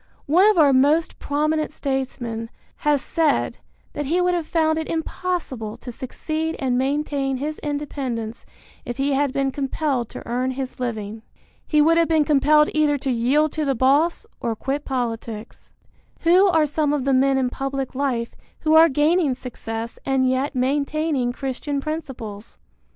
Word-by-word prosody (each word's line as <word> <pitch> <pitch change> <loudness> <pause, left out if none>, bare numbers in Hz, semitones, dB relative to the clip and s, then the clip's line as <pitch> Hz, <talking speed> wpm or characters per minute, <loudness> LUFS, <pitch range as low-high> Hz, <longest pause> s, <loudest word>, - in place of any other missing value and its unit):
One 355 +8 +5
of 430 - +2
our 290 -4 +6
most 290 +5 +3
prominent 305 +2 0
statesmen 250 -5 -3 0.3
has 295 -2 +1
said 320 -3 0 0.3
that 290 -1 -3
he 340 +5 +1
would 360 0 +2
have 340 -3 -2
found 315 -1 +1
it 320 - -4
impossible 320 -9 -3
to 245 - -8
succeed 310 +6 -3
and 260 -3 0
maintain 275 0 0
his 300 +3 -4
independence 270 -6 -4 0.4
if 240 - -5
he 275 +1 +1
had 280 0 +1
been 275 0 0
compelled 270 -3 -1
to - - -9
earn 250 +2 0
his 260 -2 -5
living. 220 -3 -4 0.5
He 300 -1 +4
would 330 +2 +4
have 335 - +3
been 315 -2 +3
compelled 300 +1 +4
either 300 -2 +2
to 270 -1 -2
yield 270 +6 +2
to 310 - -2
the 275 -2 +1
boss 285 - +2
or 230 -1 -2
quit 275 +6 -3
politics. 230 -4 -4 0.5
Who 360 +4 +5
are 325 -4 +4
some 295 0 0
of 280 -3 -1
the 275 - +2
men 270 +1 +3
in 255 -2 0
public 270 0 -3
life 255 -4 -1 0.3
who 310 0 +2
are 325 +1 +8
gaining 300 0 +2
success 230 -3 -6
and 265 -1 +2
yet 260 +3 0
maintaining 280 0 0
Christian 270 +2 -3
principles? 265 -9 -6
275 Hz, 160 wpm, -22 LUFS, 255-310 Hz, 0.5 s, are